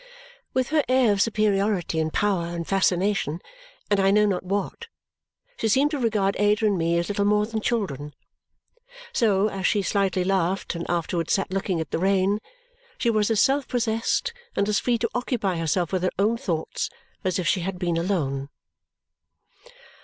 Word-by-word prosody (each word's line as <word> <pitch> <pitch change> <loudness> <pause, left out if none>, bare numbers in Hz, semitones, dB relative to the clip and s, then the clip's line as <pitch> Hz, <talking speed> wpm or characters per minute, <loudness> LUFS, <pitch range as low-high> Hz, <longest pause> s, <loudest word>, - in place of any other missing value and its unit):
With 260 -1 +1
her 310 -1 +2
air 255 -3 +4
of 195 - 0
superiority, 205 -6 +1
and 160 0 0
power, 190 -4 0
and 170 -1 -5
fascination, 190 -3 +1 0.5
and 205 - +4
I 195 0 +4
know 210 +1 +4
not 195 -3 0
what, 200 - -3 0.7
she - - 0
seemed 275 +7 +3
to 295 - -2
regard 210 -5 +1
Ada 210 +2 +3
and 205 -2 +3
me 170 -1 +1
as 170 - 0
little 205 0 0
more 210 +1 +3
than 220 0 -4
children. 150 - -2 1.0
So, 210 - +3
as 195 -2 -1
she 205 -3 +1
slightly 190 -2 +1
laughed 190 0 0
and 170 -1 -5
afterwards 170 -1 -1
sat 195 -2 0
looking 190 -2 -1
at 160 -2 -4
the - - -1
rain, 195 +2 +2 0.6
she 235 - +1
was 215 -1 +1
as 220 -2 +3
self 275 +1 +2
possessed 230 - 0 0.2
and 200 - +1
as 210 -1 +2
free 245 -1 +1
to 230 0 -1
occupy 235 -7 -1
herself 165 +2 -1
with 185 - +1
her 185 - +2
own 210 +4 +2
thoughts 170 -8 -3 0.3
as 185 -3 0
if 180 -3 -2
she 185 - +2
had 180 +1 -3
been 175 -1 -1
alone. 145 -7 -1
195 Hz, 175 wpm, -25 LUFS, 175-215 Hz, 1.0 s, air